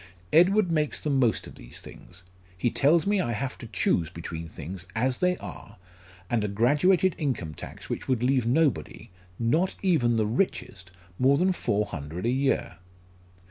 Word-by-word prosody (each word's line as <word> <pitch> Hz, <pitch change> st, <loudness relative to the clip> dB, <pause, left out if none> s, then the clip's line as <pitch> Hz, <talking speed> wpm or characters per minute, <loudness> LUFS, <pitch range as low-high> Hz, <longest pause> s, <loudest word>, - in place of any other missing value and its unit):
Edward 180 Hz, +3 st, +5 dB
makes 155 Hz, -2 st, 0 dB
the 150 Hz, -, -2 dB
most 130 Hz, -5 st, +2 dB
of -, -, -10 dB
these -, -, -8 dB
things. 90 Hz, 0 st, -12 dB, 0.3 s
He 115 Hz, +6 st, 0 dB
tells 155 Hz, +4 st, +3 dB
me 200 Hz, -1 st, +2 dB
I 120 Hz, -, -1 dB
have 130 Hz, +4 st, -3 dB
to 120 Hz, -, -8 dB
choose 90 Hz, -5 st, 0 dB
between 85 Hz, -1 st, -7 dB
things 85 Hz, +4 st, -8 dB
as 125 Hz, +3 st, 0 dB
they 180 Hz, 0 st, +2 dB
are, -, -, -10 dB, 0.5 s
and 115 Hz, +1 st, 0 dB
a -, -, 0 dB
graduated 150 Hz, -, +3 dB
income 120 Hz, -, -2 dB
tax -, -, -10 dB
which -, -, -4 dB
would 125 Hz, -3 st, 0 dB
leave 130 Hz, -2 st, +2 dB
nobody 140 Hz, -, 0 dB, 0.3 s
not 155 Hz, +11 st, +1 dB
even 145 Hz, -11 st, +3 dB
the 110 Hz, -1 st, +2 dB
richest 110 Hz, -, -2 dB, 0.3 s
more 135 Hz, +2 st, +4 dB
than 185 Hz, +3 st, +2 dB
four 105 Hz, -, 0 dB
hundred 80 Hz, +3 st, -6 dB
a 120 Hz, -, +2 dB
year." 135 Hz, -4 st, 0 dB
125 Hz, 170 wpm, -27 LUFS, 100-155 Hz, 0.5 s, Edward